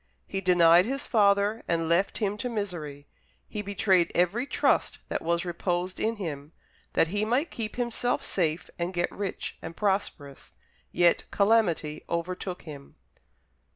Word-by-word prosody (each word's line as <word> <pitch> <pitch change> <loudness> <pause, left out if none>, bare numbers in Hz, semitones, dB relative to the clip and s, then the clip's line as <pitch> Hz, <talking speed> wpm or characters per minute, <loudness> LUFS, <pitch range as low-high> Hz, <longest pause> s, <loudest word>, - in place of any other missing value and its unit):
He 195 - -3
denied 175 -1 +6
his 270 +1 -2
father, 205 0 +3
and 165 -1 0
left 170 +4 +2
him 205 -2 0
to 250 - -2
misery; 170 -10 -5 0.4
he 210 - -4
betrayed 195 -3 +2
every 200 +9 +1
trust - - +1
that - - -2
was 170 +2 0
reposed 175 +1 -2
in 225 +1 0
him, 155 -6 -6 0.4
that 165 - +3
he 205 +3 0
might 250 +9 0
keep 220 -2 -5
himself 245 0 -1
safe 170 -1 -1
and 175 +2 -2
get 175 0 0
rich 200 -2 -5
and 165 0 -8
prosperous. 190 -9 -2 0.4
Yet 175 -1 +3
calamity 200 -8 +2
overtook 180 +2 -3
him." 145 -4 -11
185 Hz, 145 wpm, -27 LUFS, 170-210 Hz, 0.4 s, denied